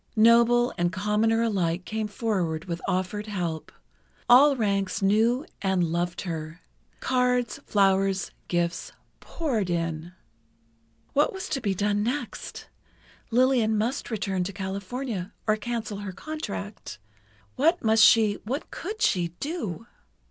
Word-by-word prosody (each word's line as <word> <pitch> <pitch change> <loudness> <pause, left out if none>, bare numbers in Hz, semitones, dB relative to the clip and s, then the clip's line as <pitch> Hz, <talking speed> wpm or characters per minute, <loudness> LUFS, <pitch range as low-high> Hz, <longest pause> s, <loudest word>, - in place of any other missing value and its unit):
Noble 235 +2 +5
and 175 0 +2
commoner 210 +3 +1
alike 180 -5 0
came 220 0 -2
forward 190 -7 -2
with 170 -2 -4
offered 185 +3 -1
help—all 210 - +1
ranks 200 -3 0
knew 225 +8 +3 0.2
and 190 -2 +1
loved 170 +1 -1
her. 160 -2 -5 0.4
Cards, 250 -2 +1
flowers, 195 -1 +2 0.2
gifts, 175 0 -1 0.3
poured 240 - -2
in. 165 0 -2 1.0
What 290 +1 +3
was 380 -1 -5
to 270 - -2
be 200 -4 0
done 205 +2 +1
next? 250 +7 -4 0.6
Lillian 240 -3 +3
must 235 +6 -1
return 195 -4 -1
to 200 - -3
California, 195 +2 -4
or 215 - +3
cancel 220 -2 -4
her 205 -2 -5
contract. 210 - -6 0.6
What 330 +6 +2
must 220 -1 +5
she—what 225 +5 +3
could 425 +5 -4
she—do? 195 - -1
210 Hz, 115 wpm, -26 LUFS, 185-240 Hz, 1.0 s, Noble